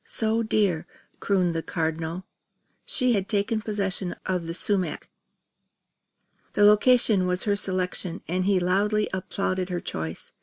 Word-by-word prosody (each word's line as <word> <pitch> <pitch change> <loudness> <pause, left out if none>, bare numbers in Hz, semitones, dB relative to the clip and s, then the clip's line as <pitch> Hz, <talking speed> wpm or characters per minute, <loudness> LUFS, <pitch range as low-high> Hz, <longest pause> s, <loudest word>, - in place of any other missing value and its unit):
So 225 +1 +1
dear!" 200 -7 +1 0.3
crooned 185 -4 +1
the 165 - -1
Cardinal 165 +2 -3 0.6
She 250 -1 +1
had 195 -3 -1
taken 215 +1 0
possession 195 -4 -2
of 180 -3 -1
the 165 - -3
sumac. 185 -4 -1 1.4
The 205 - +3
location 210 -2 +5
was 180 0 0
her 205 -1 +1
selection 185 -2 -3
and 185 +2 0
he 195 -1 +3
loudly 205 +4 +1
applauded 185 0 -2
her 180 -1 -2
choice. 80 - -5
190 Hz, 130 wpm, -26 LUFS, 180-210 Hz, 1.4 s, location